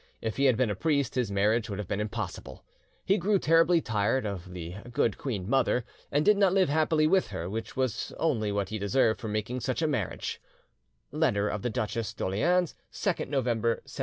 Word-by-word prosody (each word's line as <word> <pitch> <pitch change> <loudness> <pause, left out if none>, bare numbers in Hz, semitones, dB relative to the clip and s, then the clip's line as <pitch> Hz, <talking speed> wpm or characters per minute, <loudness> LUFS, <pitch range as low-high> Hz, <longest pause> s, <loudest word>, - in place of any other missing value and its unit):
If 110 -1 -4
he 140 - +2
had 130 -4 +4
been 125 -4 +2
a - - -2
priest 140 - 0
his 125 -4 0
marriage 105 +4 +1
would 100 - -4
have 105 -3 -5
been 100 - -2
impossible. 105 -3 -5 0.4
He 195 +2 +3
grew 200 +3 +2
terribly 165 0 +4
tired 110 +2 0
of 95 -3 -5
the 90 +1 -7
good 120 -4 +1
queen 105 -9 -3
mother, 125 -1 +2 0.3
and 145 +2 +2
did 210 -1 +5
not 195 -2 +4
live 190 -4 +3
happily 155 +1 +2
with 185 +4 +3
her, 85 - -5
which 110 +6 -5
was 130 -4 -1
only 115 -10 0
what 100 -1 -1
he 110 0 -4
deserved 110 +2 +2
for 110 - -4
making 110 +4 -2
such 130 +5 -2
a - - +3
marriage" 130 -11 -3 0.7
(Letter 125 -10 +1
of 105 - -3
the 120 - -1
Duchesse 110 -1 -3
d'Orleans, 175 - +1 0.2
2nd - - -1
November 120 -5 0 0.2
1717). - - -12
120 Hz, 200 wpm, -28 LUFS, 105-150 Hz, 0.7 s, did